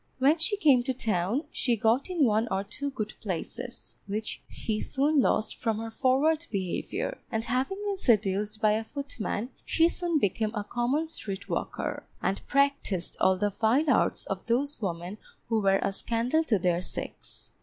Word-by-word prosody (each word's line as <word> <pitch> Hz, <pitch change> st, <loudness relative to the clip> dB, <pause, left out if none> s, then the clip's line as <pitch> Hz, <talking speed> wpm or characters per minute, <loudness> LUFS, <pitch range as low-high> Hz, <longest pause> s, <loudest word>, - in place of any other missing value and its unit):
When 280 Hz, +5 st, +4 dB
she 410 Hz, +6 st, +2 dB
came 285 Hz, -10 st, +5 dB
to 255 Hz, +1 st, -2 dB
town, 215 Hz, -, 0 dB
she 245 Hz, -2 st, +1 dB
got 230 Hz, -, +2 dB
in 340 Hz, -6 st, +3 dB
one 220 Hz, 0 st, +2 dB
or 190 Hz, +1 st, 0 dB
two 280 Hz, +8 st, -4 dB
good 215 Hz, -6 st, -4 dB
places, 225 Hz, +5 st, -5 dB
which 210 Hz, +2 st, -3 dB
she 215 Hz, -1 st, -3 dB
soon 285 Hz, +1 st, +2 dB
lost 215 Hz, -, +1 dB
from 225 Hz, -2 st, -1 dB
her 225 Hz, +1 st, -5 dB
forward 295 Hz, +7 st, +2 dB
behaviour; 195 Hz, -, -2 dB
and 225 Hz, -1 st, 0 dB
having 255 Hz, +11 st, 0 dB
been 400 Hz, -2 st, -1 dB
seduced 210 Hz, -, +2 dB
by 215 Hz, -1 st, +4 dB
a 220 Hz, +1 st, +1 dB
footman, 250 Hz, -3 st, -4 dB
she 330 Hz, 0 st, +4 dB
soon 345 Hz, -2 st, 0 dB
became 215 Hz, -2 st, 0 dB
a 210 Hz, -, -1 dB
common 245 Hz, +9 st, 0 dB
street 200 Hz, -11 st, -6 dB
walker, -, -, -3 dB
and 195 Hz, -, -1 dB
practised 275 Hz, -10 st, +1 dB
all 190 Hz, 0 st, +4 dB
the 205 Hz, +2 st, +1 dB
vile 245 Hz, +9 st, +3 dB
arts -, -, +2 dB
of 195 Hz, -1 st, -4 dB
those 270 Hz, +4 st, 0 dB
women 180 Hz, +1 st, -3 dB, 0.3 s
who 225 Hz, -1 st, +2 dB
were 195 Hz, -1 st, +4 dB
a -, -, 0 dB
scandal 235 Hz, +10 st, +1 dB
to 225 Hz, -8 st, +3 dB
their 175 Hz, -1 st, +1 dB
sex. 180 Hz, -, -6 dB
230 Hz, 175 wpm, -28 LUFS, 205-280 Hz, 0.3 s, came